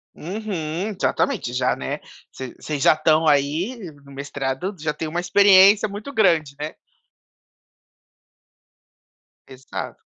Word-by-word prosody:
Uhum! 185 -1 -4
Exatamente, 210 - 0
já 125 0 +1
né, 65 - -4 0.3
vocês 130 -2 -8
vocês 150 -3 -4
já - - +6
estão 155 +1 +2
aí 150 - +1 0.2
no 145 0 -21
no 140 - -14
mestrado, 140 +6 -4
já 150 0 -1
tem 160 - -5
uma 170 +3 -2
experiência 200 +3 +6
muito 205 +7 -7
grande, 165 - +2
né. 150 +1 -4 2.7
Exato. 130 0 -7
155 Hz, 120 wpm, -22 LUFS, 140-195 Hz, 2.7 s, já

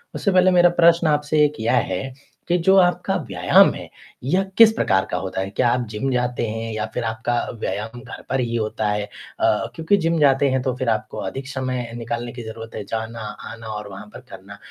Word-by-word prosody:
उससे 200 - 0
पहले 185 0 +5
मेरा 175 -1 +6
प्रश्न 170 0 +5
आपसे 150 0 +2
एक 150 -3 -3
यह 110 - +1 0.2
है, 125 +9 -4 0.3
कि 175 - +2
जो 190 +3 +4
आपका 180 -2 +2
व्यायाम - - +5
है - - -9 0.3
यह 180 +9 +1
किस 230 -1 +9
प्रकार 95 - +1
का - - 0
होता 95 +1 -3
है? 95 - -3
क्या 120 +5 +1
आप 125 +1 +1
जिम 110 +5 -2
जाते 125 -1 -1
हैं 115 +1 -4
या 110 0 -2
फिर 125 - -2
आपका 110 +1 -2 0.3
व्यायाम 110 +4 -4
घर - - -10
पर 135 - 0
ही 120 -2 -1
होता 110 -1 -1
है? 105 0 -1
अ, - - -2
क्योंकि 165 +5 +2
जिम 165 -2 0
जाते 140 -1 +4
हैं 130 0 0
तो 130 -1 -1
फिर 130 -2 -1
आपको 110 -1 -2
अधिक 130 +8 -5
समय 130 -3 -3
निकालने 120 +1 -4
की 120 - -8
ज़रूरत 115 0 -9
है, 105 - -4
जाना, 110 +2 -5
आना 110 +1 -8
और 105 -1 -5
वहाँ 100 +2 -10
पर - - -9
करना - - -11
120 Hz, 215 wpm, -22 LUFS, 110-150 Hz, 0.3 s, किस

